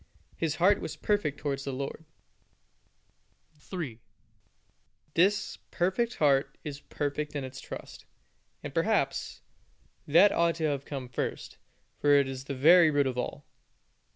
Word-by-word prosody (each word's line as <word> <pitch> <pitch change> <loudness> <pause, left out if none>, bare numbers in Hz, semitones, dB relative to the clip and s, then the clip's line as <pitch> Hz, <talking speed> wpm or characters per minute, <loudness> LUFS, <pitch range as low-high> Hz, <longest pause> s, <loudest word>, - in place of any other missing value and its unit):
His 160 -2 -1
heart 190 +4 +3
was - - -5
perfect 205 -9 0
towards 140 -2 -3
the 140 - -3
Lord 140 +4 -5 1.5
his 150 - -29
God. - - -23
3. 150 - -5 1.1
This 195 +5 +2
perfect 190 +7 0
heart 135 -2 +2
is 145 -2 -6
perfect 150 +1 -3
in 140 - -2
its 130 0 -8
trust: - - -9 0.6
and, - - -6
perhaps, - - 0 0.7
that 175 +8 +6
ought 170 0 +2
to 165 - -4
have 140 -2 -1
come 135 -3 -5
first, 120 - -4 0.4
for 145 0 +4
it 140 -1 +4
is 135 0 -6
the 140 - -4
very 165 +5 +7
root 145 -2 +2
of 130 -2 -1
all. - - -4
145 Hz, 145 wpm, -29 LUFS, 135-170 Hz, 1.5 s, very